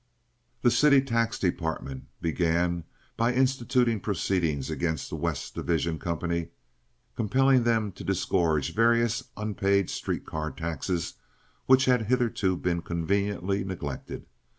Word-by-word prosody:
The 120 - +5
city 140 +3 +6
tax 115 -3 0
department 80 -7 -2 0.2
began 85 0 0 0.3
by 120 +2 +2
instituting 125 -3 +2
proceedings 85 -8 -1
against 80 +1 -2
the - - -3
West - - -3
Division 85 -1 -1
company, 85 0 -2 0.7
compelling 130 +3 +3
them 110 -3 +2
to - - -10
disgorge 80 -5 +1
various 115 +1 +2
unpaid 100 -3 +1
street - - -3
car 80 0 -3
taxes 85 +2 -3 0.5
which 130 0 +6
had 125 -4 +2
hitherto 115 -7 +1
been 85 -1 -1
conveniently 100 +3 -1
neglected. 80 -8 -6
95 Hz, 115 wpm, -27 LUFS, 85-115 Hz, 0.7 s, city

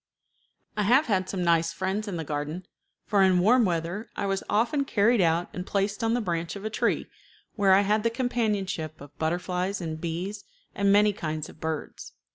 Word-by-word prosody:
I 210 - 0
have 250 +9 +4
had 190 -7 0
some 185 -2 -2
nice 165 -1 +3
friends 190 +5 -2
in 190 -4 -3
the 165 - -3
garden, 150 +4 -4 0.4
for 205 -2 +2
in 190 -1 +5
warm 225 +6 +5
weather 175 +5 -2
I - - -2
was 195 -1 0
often 235 +7 +2
carried 225 -3 +3
out 170 0 +2
and 180 - -4
placed 200 +2 -1
on 225 +1 +2
the 245 - 0
branch 170 -3 -2
of 200 +1 -7
a 215 - -2
tree, - - 0 0.5
where 195 -3 +4
I 195 - +5
had 210 +2 +2
the 230 - +2
companionship 215 - -2
of 145 0 -13
butterflies 180 +4 -1
and 160 -3 -5
bees 175 +5 -4 0.3
and 200 0 +2
many 205 +1 +5
kinds 155 -4 -4
of - - -15
birds. 160 -1 -5
190 Hz, 195 wpm, -27 LUFS, 170-210 Hz, 0.5 s, in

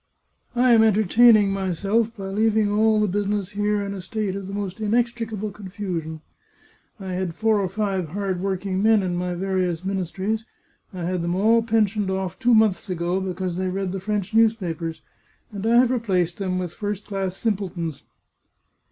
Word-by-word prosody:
I 245 +1 +4
am 230 -2 +7
entertaining 215 0 +5
myself 200 +5 0
by 195 -1 -5
leaving 215 +1 +2
all 215 +1 +3
the 210 - +2
business 205 0 -1
here 205 0 0
in 200 0 -4
a 195 - -6
state 200 +1 -3
of 195 -1 -5
the - - -6
most 200 -1 -4
inextricable 225 -1 -1
confusion. 185 -6 -5 0.8
I 190 -2 -5
had 180 -2 -3
four 220 +2 +2
or 190 -2 -1
five 195 -4 -2
hard 190 0 -2
working 190 0 -2
men 220 -1 +4
in 180 -1 -1
my 180 0 -2
various 185 -2 -1
ministries; 195 +3 -2 0.5
I 185 -3 -6
had 180 +1 -1
them 170 +1 -1
all 225 +4 +4
pensioned 215 -3 +1
oflf, 190 -2 -3
two 245 -2 +4
months 215 -4 +2
ago, 175 +1 -1
because 185 -1 -3
they 185 0 -1
read 190 0 -2
the 195 - -3
French 205 0 -3
news 225 0 +5
papers, 165 -5 -5 0.5
and 200 -2 -6
I 230 - +4
have 250 0 +5
replaced 185 -8 0
them 185 -2 -1
with 180 -2 -3
first 205 -1 -4
class 195 -2 -3
simple 205 -4 -1
tons." 165 -4 -5
195 Hz, 180 wpm, -23 LUFS, 185-215 Hz, 0.8 s, am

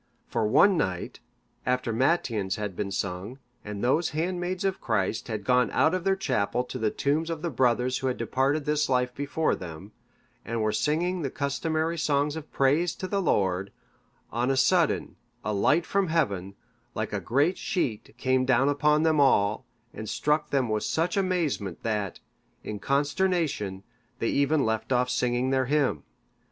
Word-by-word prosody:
For 115 -3 0
one 195 - +5
night, 95 - -2 0.4
after 125 -2 0
matins 115 - +1
had 105 -3 -4
been 100 +1 -3
sung, 100 +5 -4 0.3
and 105 -1 -6
those 150 +7 +2
handmaids 180 +2 -2
of 190 0 -1
Christ 110 -2 -1
had 110 -3 -4
gone 125 +1 +3
out 160 - +2
of 185 -2 -1
their 195 0 +3
chapel 125 - 0
to 130 +1 -7
the 110 -1 +1
tombs 150 +8 0
of 165 -1 -4
the 170 - -1
brothers 125 0 +1
who 135 - -2
had 130 - -1
departed 140 +3 0
this 150 0 +1
life 125 -1 +1
before 145 +4 0
them, 90 +3 -7 0.5
and 115 0 -3
were 110 - +1
singing 170 - 0
the 140 - -1
customary 155 +4 -1
songs 145 0 +1
of 160 -1 -8
praise 150 +5 +2
to 185 - -5
the 200 +1 0
Lord, 95 - +1 0.6
on 120 +3 0
a 135 - +1
sudden 165 +5 +2 0.3
a 105 - 0
light 150 +11 +3
from 200 -1 +1
heaven, 100 - -1 0.4
like - - -3
a - - 0
great 145 +9 +1
sheet, 125 - -2
came 130 0 +2
down 130 +1 +3
upon 150 +1 +3
them 160 -2 +3
all, 105 -7 +3 0.3
and 110 - -6
struck 150 0 0
them 135 -3 +1
with 110 -1 0
such 165 +2 0
amazement, 170 - -1
that, 105 -4 -2 0.4
in 105 -1 -5
consternation, 145 - 0 0.3
they - - -1
even 140 +1 +2
left 110 +3 -2
off 125 0 +2
singing 125 +1 0
their 130 -1 +2
hymn. 135 - +1
135 Hz, 170 wpm, -27 LUFS, 110-160 Hz, 0.6 s, one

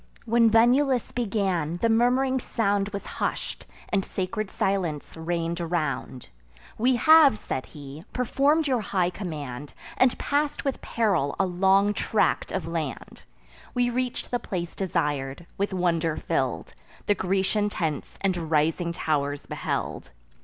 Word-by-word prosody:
When 230 0 +4
Venulus 245 +3 +3
began, 190 -8 -1
the 230 - +1
murmuring 250 +3 +3
sound 205 -4 0
Was 200 -1 -6
hush'd, - - -4 0.2
and 195 -2 +1
sacred 195 +3 -3
silence 180 -8 -1
reign'd 170 +1 -2
around. 150 -7 -3 0.5
"We 250 +3 +2
have," 310 -2 +7
said 130 - -4
he, 145 +1 -10
"perform'd 280 +5 +2
your 255 -4 +1
high 185 -3 0
command, 150 -8 -6 0.2
And 255 -1 +4
pass'd 290 +1 -1
with 275 -2 -2
peril 195 -12 0
a 195 - +4
long 195 +3 +3
tract 215 - +1
of 190 -4 -3
land: 165 -4 -5 0.5
We 245 0 +2
reach'd 250 0 -3
the 245 - +1
place 175 -6 -4
desir'd; 145 -5 -2
with 200 +1 0
wonder 170 -3 0
fill'd, - - -2 0.3
The 205 - +4
Grecian 195 +2 0
tents 160 -7 -3
and 180 -5 -1
rising 165 +2 +1
tow'rs 145 -3 -1
beheld. - - -3
190 Hz, 130 wpm, -26 LUFS, 165-230 Hz, 0.5 s, have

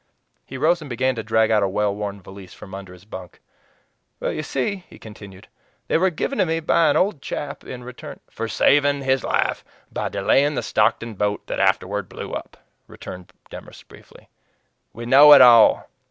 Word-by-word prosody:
He 130 - -8
rose 165 +5 +1
and 150 - -9
began 130 +2 0
to 115 - -5
drag 110 0 +1
out 110 -1 +3
a 100 - +1
well 105 +1 -1
worn 100 -1 -6
valise 95 -1 -13
from 95 - -13
under 95 -1 -9
his 90 +2 -16
bunk. 95 -4 -11 0.8
"You 155 - -3
see," 165 +7 -3
he - - -14
continued, 100 -3 -13 0.4
"they - - +1
were 190 +2 +3
given 195 - -4
to 190 - +3
me 165 0 -1
by 165 0 +2
an 145 - +2
old 185 -7 0
chap 145 +1 -6
in 125 -1 -9
return 125 0 -10
" - - -36
"For 115 - -5
saving 145 +3 +2
his 130 -1 0
life - - -1 0.3
by - - -3
delaying 145 +2 +1
the - - -2
Stockton 110 +1 0
boat 105 0 -2
that - - -5
afterward 95 0 0
blew - - -8
up," - - -7 0.3
returned 90 -1 -11 0.2
Demorest - - -12
briefly. - - -18 0.6
"We 120 +1 -9
know 145 +4 +8
it 140 - +8
all! 120 -3 +6
120 Hz, 190 wpm, -21 LUFS, 100-145 Hz, 0.8 s, know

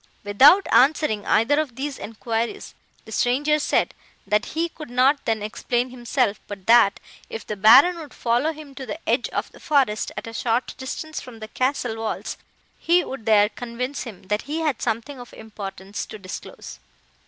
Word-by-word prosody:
"Without 275 - +6
answering 270 -6 +3
either 265 +7 +3
of 285 -6 -3
these 275 +1 -4
enquiries, 225 +2 -4 0.3
the 220 - -12
stranger 285 +7 +2
said, - - +1 0.3
that 210 +1 +1
he 335 +1 +2
could 310 -3 -11
not 260 +4 +3
then 220 -2 0
explain 240 +3 -2
himself, 240 -3 -1
but 200 -2 -8
that, 230 -3 +5 0.3
if 225 - -7
the 210 - -4
Baron 260 - +7
would 300 -4 -9
follow 245 +6 0
him 305 -3 -11
to 265 -1 -8
the - - -4
edge - - +1
of - - -3
the - - -16
forest, 265 -9 +1
at - - -5
a 230 - -8
short 230 +3 -1
distance 305 +4 -5
from 250 -3 -11
the 215 0 -8
castle 255 -2 -1
walls, 225 -1 -4 0.4
he 350 +1 +3
would 255 -4 -8
there 210 -1 +5
convince 245 +4 -5
him, 215 -7 -9
that 210 +3 -1
he 315 +2 -2
had 300 -6 -1
something 235 +4 -3
of 245 - -11
importance 200 -2 -7
to 215 - -9
disclose. 190 -2 -9
240 Hz, 175 wpm, -23 LUFS, 215-285 Hz, 0.4 s, Baron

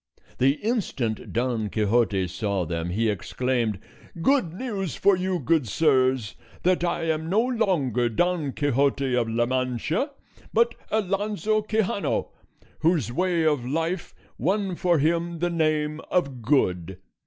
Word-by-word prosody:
The 135 +2 +4
instant 175 - -2
Don 120 -3 -1
Quixote 105 -2 +1
saw 95 +1 -2
them 85 +1 -3
he 110 +6 0
exclaimed: 115 +2 -1 0.4
"Good 250 - +2
news 195 - -4
for 200 -1 +4
you, 185 0 -1
good 160 -8 +1
sirs, 130 -3 +2 0.3
that 180 -1 +2
I 170 -1 0
am 160 0 -1
no 205 +5 +3
longer 180 - +1
Don 160 +4 0
Quixote 140 -1 +1
of 120 -2 +1
La 115 +1 +1
Mancha, 130 - -1 0.4
but 235 +1 +3 0.2
Alonso 210 +1 0
Quixano, 220 - -1 0.5
whose 155 - +2
way 175 +1 +1
of 150 -5 +2
life 165 +7 -2 0.2
won 195 -1 0
for 175 -1 +2
him 170 +3 0
the 175 +1 -1
name 155 -2 0
of 140 -9 0
Good. 95 - +1
155 Hz, 130 wpm, -25 LUFS, 120-185 Hz, 0.5 s, The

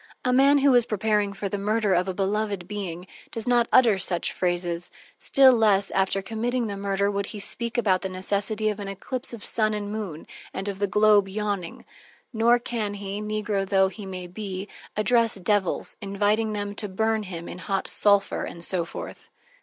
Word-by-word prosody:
A 250 - +2
man 275 +3 +5
who 280 -1 +4
is 245 -1 +4
preparing 210 -1 +1
for 200 0 -4
the 200 +1 -3
murder 210 0 +1
of 180 +1 +1
a 190 - -2
beloved 200 -1 -1
being, 185 -4 -5 0.2
does 225 +1 -6
not 240 -1 +3
utter 230 -6 +5
such 175 -1 0
phrases, 175 -1 -1 0.3
still 270 -2 +5
less 205 -4 +3
after 195 0 +1
committing 235 +4 -2
the 205 -2 -4
murder 200 0 0
would 200 0 -2
he 210 - -7
speak 235 +4 0
about 195 -6 +2
the 190 - -3
necessity 200 +3 -1
of 210 -1 -4
an 200 - -5
eclipse 240 +7 -4
of 235 -3 -8
sun 215 -1 +2
and 205 -1 -4
moon, 200 -8 -5 0.3
and 190 +1 -4
of 195 -1 -4
the 200 - +1
globe 210 0 +4
yawning; 200 -3 -4 0.5
nor 235 +2 +4
can 225 -4 -3
he, 200 0 -5
negro 210 -1 -1
tho 190 0 +3
he 200 0 -9
may 185 -1 -6
be, 190 +1 -6 0.3
address 230 +1 +3
devils, 195 0 -1
inviting 210 +2 0
them 205 -1 -3
to 210 0 -3
burn 220 +3 0
him 175 -4 -7
in 180 - -8
hot 195 +1 -2
sulphur 200 -1 +2
and 170 - -7
so 175 0 +2
forth. - - -9
205 Hz, 190 wpm, -25 LUFS, 195-220 Hz, 0.5 s, man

